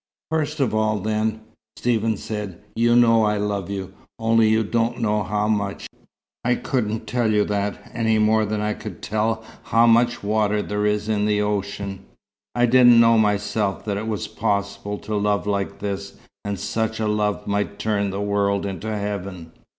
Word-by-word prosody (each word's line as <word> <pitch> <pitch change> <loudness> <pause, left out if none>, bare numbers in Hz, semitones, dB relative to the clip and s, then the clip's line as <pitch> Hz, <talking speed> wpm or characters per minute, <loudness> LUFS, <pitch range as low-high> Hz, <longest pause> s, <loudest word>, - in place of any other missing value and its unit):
"First 155 -1 -1
of 135 -5 +1
all, 110 0 +1
then," 110 +2 -1 0.4
Stephen 115 -2 +1
said, 105 -5 -5 0.2
"you 120 +1 +3
know 115 -2 +5
I 105 0 +2
love 100 -2 -2
you. 95 -1 -5 0.2
Only 115 -1 +3
you 110 +1 +3
don't 115 +2 0
know 105 -2 +1
how 105 +1 -1
much. 100 -2 -1 0.6
I 125 +1 +2
couldn't 110 -5 -2
tell 120 -3 0
you 105 -1 +3
that, 100 -1 -3
any 110 -2 +1
more 110 +1 +3
than 105 0 -2
I 105 0 0
could 105 -6 -9
tell 110 +2 -1 0.2
how 115 +1 +4
much 120 0 +3
water 105 0 +1
there 105 0 -1
is 105 0 0
in 105 -1 +1
the 105 -1 +2
ocean. 100 -1 -3 0.5
I 120 0 +4
didn't 120 -1 +7
know 115 -1 +6
myself 105 -1 0
that 100 -2 -1
it 110 +2 -4
was 110 -2 -2
possible 100 -1 -2
to 110 - -6
love 105 0 +1
like 100 -1 -2
this, 100 0 -5 0.3
and 100 -1 -3
such 110 +2 -2
a 110 - 0
love 105 -1 0
might 100 -1 -1
turn 100 -2 0
the 100 +1 -3
world 100 -1 0
into 100 +2 -4
heaven. 100 -5 -5
105 Hz, 175 wpm, -22 LUFS, 100-110 Hz, 0.6 s, didn't